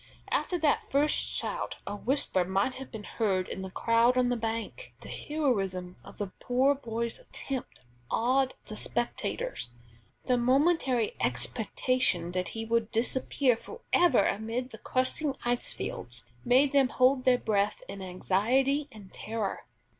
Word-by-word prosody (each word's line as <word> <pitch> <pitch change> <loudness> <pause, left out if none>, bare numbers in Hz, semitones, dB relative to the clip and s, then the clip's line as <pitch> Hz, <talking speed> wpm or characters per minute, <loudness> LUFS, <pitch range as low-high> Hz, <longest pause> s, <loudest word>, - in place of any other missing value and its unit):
After 360 - +1
that 310 -3 +1
first 290 +2 +3
shout - - -2
a - - -4
whisper 225 -5 +1
might 195 +7 0
have 265 0 -8
been 220 -2 -7
heard 195 -4 0
in - - -5
the 190 - -5
crowd 230 +5 +3
on 250 -1 +3
the 245 - +1
bank. 230 - -4
The - - -10
heroism 195 -12 -1
of - - -13
the 200 -2 -4
poor 260 +3 +3
boy's 235 - -4
attempt 275 - -6 0.3
awed 260 +3 +2
the 215 - -7
spectators, 240 - -2 0.5
and - - -26
the 250 - +3
momentary 260 -2 +3
expectation 175 - +1
that 180 0 -2
he 225 - -2
would 230 -1 +1
disappear 250 +2 +1
forever 350 - +2
amid 230 +5 -2
the 220 - -10
crushing 265 +2 0
ice 240 0 +1
fields, 120 0 -5 0.2
made 265 +3 +4
them 275 -3 +4
hold 255 +1 +3
their 255 -1 +5
breath 210 -3 0
in 195 0 -7
anxiety 240 +10 +1
and 205 -3 -13
terror. 215 -2 -3
240 Hz, 145 wpm, -29 LUFS, 205-265 Hz, 0.5 s, their